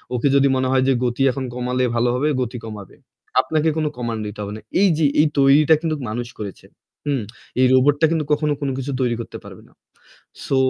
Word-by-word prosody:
ওকে 125 +4 +1
যদি 140 0 +5
মনে 130 0 0
হয় 130 -1 +3
যে 135 - +4
গতি 125 +2 -1
এখন 130 0 -4
কমালে 125 +1 -1
ভালো 120 +1 +2
হবে, 145 +4 0
গতি 125 0 -3
কমাবে। 105 -3 -9 0.5
আপনাকে 155 0 0
কোন 155 - 0
কমান্ড 115 -3 -3
দিতে 105 0 -9
হবে 100 +1 -6
না। - - -11 0.2
এই 200 - +6
যে 160 - +2
এই 155 - +5
তৈরিটা 140 +3 +5
কিন্তু 160 -2 -1
মানুষ 120 +2 -4
করেছে। 100 -4 -7 0.4
হুম। 140 -4 0 0.4
এই 130 - +5
রোবটটা 145 +4 +4
কিন্তু 160 -3 0
কখনো 150 0 +2
কোন 140 - -1
কিছু 135 +1 -4
তৈরি 120 -2 +1
করতে - - -8
পারবে - - -12
না। - - -24 0.7
সো 135 - 0
130 Hz, 205 wpm, -21 LUFS, 120-145 Hz, 0.7 s, এই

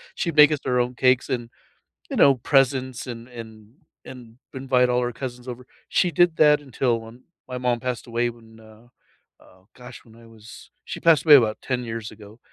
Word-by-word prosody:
she'd 170 -4 -3
make 150 0 +7
us 150 - -1
our 125 -1 +1
own 125 +1 -1
cakes 130 +1 +1
and, 120 -3 -3 0.6
you - - -4
know, 135 -1 +5
presents 130 -1 0
and 120 -1 -8
and 110 -2 -12 0.3
and 120 -2 -13 0.2
invite 130 -1 +1
all 125 0 +1
our 125 0 -2
cousins 125 0 -8
over. 125 0 -8 0.2
She 180 - +1
did 175 +1 +2
that 150 -1 +4
until 125 -3 -1
when 115 +3 -14 0.2
my 125 0 -6
mom 125 -1 -1
passed 125 -1 -5
away 120 +1 -1
when, 115 -1 -16
uh, 110 +2 -18 0.5
oh 95 +1 -23
gosh, 125 -1 -13
when 110 - -19
I 115 0 -17
was 110 -1 -15
she - - -7
passed 165 -2 +3
away 150 -2 +9
about 110 -5 +3
10 125 -2 -3
years 115 -1 -6
ago. 105 +1 -15
125 Hz, 195 wpm, -23 LUFS, 115-130 Hz, 0.6 s, away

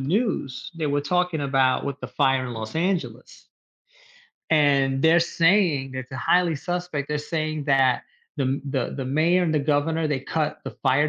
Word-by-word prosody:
news, 160 - -2
they 160 -2 -2
were 145 0 0
talking 180 +2 0
about 135 -2 +1
with 140 -1 -4
the - - -5
fire 135 -1 +1
in 120 - -6
Los 110 +1 -6
Angeles 180 +1 -3 1.0
and 140 -3 +3
they're 165 +2 +5
saying 165 -6 +2
it's 130 0 -7
a - - -4
highly 170 +6 +2
suspect 175 -3 -4
they're 150 0 -1
saying 155 -1 -3
that 135 -3 +3 0.3
the 140 - 0
m 135 +2 -1
the 135 -3 -2
the 135 - -3
mayor, 160 +7 +2
and 165 - 0
the 155 - +2
governor, 155 +2 0
they 145 -3 -1
cut 150 +2 -2
the - - -5
fire 140 +3 +3
145 Hz, 180 wpm, -24 LUFS, 135-165 Hz, 1.0 s, they're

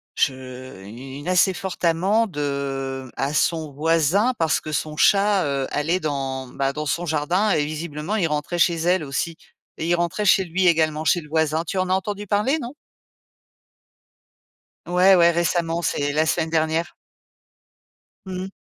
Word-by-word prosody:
je 130 -5 -3
u 125 +6 -10
une 145 - -9
assez 185 +1 +4
fort 190 0 -5
amende, 185 +4 +1
heu, 135 -2 -3
à 140 +2 -2
son 160 -1 0
voisin 165 - +2
parce 160 -2 +1
que 155 - -7
son 155 +1 -2
chat, 200 0 +4
heu, 140 -2 -1
allait 165 +5 0
dans, 135 -3 -3
bah, 135 +1 -2
dans 150 +1 -4
son 170 +4 -1
jardin 175 +8 +1
et 145 - +2
visiblement, 155 +4 -4
il 170 -5 +1
rentrait 150 +3 -2
chez 170 0 +4
elle 175 +1 +1
aussi, 160 +4 -3 0.4
et 160 - -3
il 175 - +3
rentrait 175 +5 -1
chez 190 0 +5
lui 180 +1 0
également, 155 -2 +2
chez 175 +3 +3
le 150 - -14
voisin. 160 0 +1
Tu 190 +3 -5
en 185 0 -1
as - - +2
entendu 205 +1 -3
parler, 215 +11 +1
non? 240 +4 -6 2.1
Ouais, 185 +2 +5
ouais, 170 -1 +5
récemment, 170 0 0
c'est 145 -3 -1
la 155 +1 +2
semaine 160 0 0
dernière. 160 +1 0 1.3
Mmh 190 - -6
mh. 190 - -6
160 Hz, 165 wpm, -22 LUFS, 145-185 Hz, 2.1 s, chez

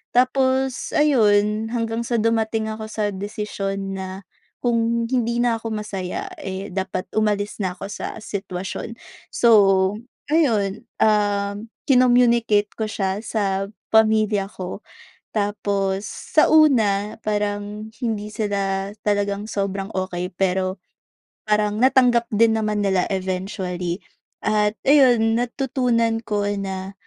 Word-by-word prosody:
Tapos, 260 0 +2
ayun 215 -6 +3
hanggang 230 0 -1
sa 235 - -1
dumating 225 -1 0
ako 220 0 -6
sa 210 -1 -1
desisyon 195 -1 -4
na, 190 +1 -6 0.4
kung 230 0 +1
hindi 235 -2 0
na 235 -2 +2
ako 225 - -5
masaya 195 -4 -4
eh, 190 +1 -5
dapat 190 -1 -3
umalis 210 -1 0
na 185 -2 -1
ako 195 - -6
sa - - -5
sitwasyon. 200 +2 -5 0.3
So, 235 - +2 0.8
ayun 230 -8 +1
um, 205 0 +1 0.2
kinommunicate 240 -5 +4
ko 220 -1 -3
siya 195 -1 -2
sa 195 -3 -1 0.2
pamilya 215 -2 +3
ko. 185 +1 -7 0.5
Tapos, 200 -1 -1
sa 310 - +1
una 220 -10 +4
parang 210 0 -2
hindi 215 -3 -2
sila 200 -3 -2
talagang 205 0 -1
sobrang 195 -1 -2
okey, 180 -1 -2
pero, 185 0 0 0.7
parang 210 0 +1
natanggap 250 -2 +4
din 225 +1 +4
naman 210 -1 -1
nila 190 -2 +1
eventually. 185 -2 -3 0.5
At 210 0 +1
ayun 245 -5 +5
natutunan 240 -3 0
ko 210 -3 -1 0.2
na, 190 0 -5
210 Hz, 115 wpm, -22 LUFS, 195-230 Hz, 0.8 s, ayun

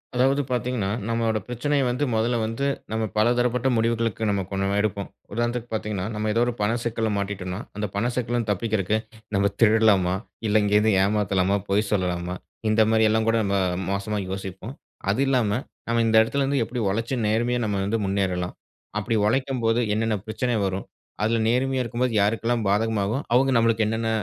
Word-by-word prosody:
அதாவது 135 +3 +3
பாத்தீங்கனா, 125 -4 -1 0.2
நம்மளோட 115 -1 0
பிரச்சனைய 135 +4 0
வந்து, 125 +4 -1
முதல்ல 115 +2 +1
வந்து 115 +5 -2 0.3
நம்ம 110 0 -1
பலதரப்பட்ட 120 +2 +2
முடிவுகளுக்கு 115 -1 0
நம்ம 100 -1 +1
கொஞ்சம் 95 0 -1
எடுப்போம். 100 -1 -1 0.3
உதாரணத்துக்கு 120 +1 -2
பாத்தீங்கனா, 105 -3 -2
நம்ம 105 0 -2
ஏதோ 115 - +2
ஒரு 120 - -1
பண 105 +2 +2
சிக்கல 115 -1 -1
மாட்டிட்டோன்னா, 95 -1 -3 0.2
அந்த 105 0 -2
பண 115 +4 +1
சிக்கல 120 -1 -1
இருந்து 115 -3 -1
தப்பிக்குறதுக்கு 105 0 0 0.4
நம்ம 100 +1 +2
திருடலாமா? 105 -5 +4 0.3
இல்ல 105 0 +3
எங்கயாது 105 +1 +3
ஏமாத்தலாமா? 100 -1 +1
பொய் 105 +2 +2
சொல்லலாமா? 90 -2 -1 0.3
இந்த 110 +1 +4
மாரி 110 0 +4
எல்லா 110 +1 +2
கூட 115 - +3
நம்ம 100 -1 0 0.4
மோசமா 100 +2 -2
யோசிப்போம். 95 +6 -6 0.4
அது 120 - 0
இல்லாம, 125 -6 +2 0.4
நம்ம 115 0 +2
இந்த 110 - +2
இடத்துல 140 +5 -1
இருந்து 135 -2 +1
எப்படி 125 +1 -4
உழைச்சு 115 +6 -1
நேர்மையா 120 +3 +1
நம்ம 105 -2 -1
வந்து 110 +3 0
முன்னேறலாம்? 95 -2 -1 0.4
அப்டி 105 +2 -1
உழைக்கும்போது 120 -2 +1
என்னென்ன 110 0 +1
பிரச்சன 115 +2 -1
வரும்? 95 0 -2 0.4
அதுல 115 +1 +2
நேர்மையா 130 +2 +1
இருக்கும்போது 120 0 -1
யாருக்கெல்லா 115 +3 +1
பாதகமாகும்? 110 +4 0
அவங்க 135 +2 +4
நமக்கு 115 -1 +2
என்னென்ன 110 +1 -1
110 Hz, 160 wpm, -24 LUFS, 100-120 Hz, 0.4 s, திருடலாமா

